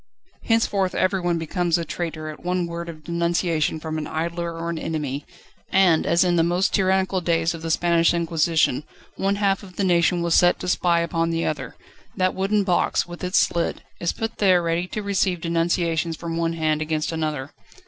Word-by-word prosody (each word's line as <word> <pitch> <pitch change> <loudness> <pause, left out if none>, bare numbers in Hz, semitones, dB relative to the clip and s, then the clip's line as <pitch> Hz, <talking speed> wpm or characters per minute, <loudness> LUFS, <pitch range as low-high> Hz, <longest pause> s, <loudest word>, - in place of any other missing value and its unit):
Henceforth 205 -5 +1
everyone 185 -3 +1
becomes 170 +1 0
a 170 - -3
traitor 160 -3 -4
at 155 - -10
one 180 0 0
word 170 0 -5
of 155 -2 -10
denunciation 170 -1 0
from 155 0 -4
an 150 - -5
idler 170 +1 -3
or 165 0 -4
an 165 - -4
enemy, 145 -4 -3 0.4
and, 185 -4 +4
as 170 +1 +4
in 175 -1 +2
the 165 - +4
most 175 +3 +1
tyrannical 190 -1 +2
days 165 0 +1
of 165 - -8
the 165 - -4
Spanish 170 0 +3
Inquisition 165 -4 +1 0.3
one 195 +1 0
half 200 -1 +1
of 185 -3 -13
the 200 - -1
nation 175 -1 +2
was 170 -1 +1
set 175 +1 +5
to 180 - -4
spy 175 -1 +2
upon 165 0 0
the 165 0 -1
other, 155 - -3 0.4
that 185 -1 +2
wooden 200 +2 +1
box, 180 -3 +1
with 175 +1 -10
its 180 +2 +3
slit, 170 -1 -1 0.2
is 170 - 0
put 225 0 -5
there 185 -4 +4
ready 170 +1 0
to 210 +3 -5
receive 190 -3 0
denunciations 165 -1 0
from 165 -1 -5
one 165 0 0
hand 155 -2 0
against 155 0 -1
another. 155 -4 -3
170 Hz, 190 wpm, -23 LUFS, 165-180 Hz, 0.4 s, set